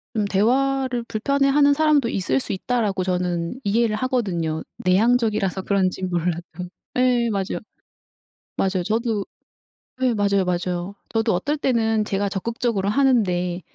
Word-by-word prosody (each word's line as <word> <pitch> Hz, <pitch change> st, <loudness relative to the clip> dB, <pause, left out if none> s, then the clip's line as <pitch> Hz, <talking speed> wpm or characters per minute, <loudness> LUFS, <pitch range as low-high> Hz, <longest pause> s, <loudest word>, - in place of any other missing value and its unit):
좀 215 Hz, -, +1 dB
'대화를 255 Hz, +4 st, +1 dB
불편해하는 280 Hz, +5 st, +2 dB
사람도 300 Hz, -4 st, +3 dB
있을 165 Hz, -, 0 dB
수 -, -, -4 dB
있다.'라고 200 Hz, -2 st, -1 dB
저는 180 Hz, +3 st, -2 dB
이해를 215 Hz, +1 st, +2 dB
하거든요 190 Hz, -11 st, -1 dB, 0.2 s
내향적이라서 210 Hz, -1 st, +2 dB
그런진 190 Hz, -2 st, 0 dB
몰라도. 175 Hz, -1 st, -1 dB, 0.6 s
예 250 Hz, -2 st, +3 dB
맞아요. 195 Hz, -3 st, -2 dB, 1.0 s
맞아요. 190 Hz, -2 st, 0 dB
저도 220 Hz, 0 st, -1 dB, 0.7 s
네 255 Hz, -2 st, +2 dB
맞아요, 200 Hz, -2 st, +2 dB
맞아요. 180 Hz, +2 st, -2 dB
저도 225 Hz, 0 st, +1 dB
어떨 285 Hz, +12 st, -1 dB
때는 225 Hz, -5 st, +1 dB
제가 200 Hz, 0 st, -1 dB
적극적으로 210 Hz, 0 st, -1 dB
하는데 195 Hz, -8 st, +1 dB
210 Hz, 315 characters per minute, -22 LUFS, 185-245 Hz, 1.0 s, 사람도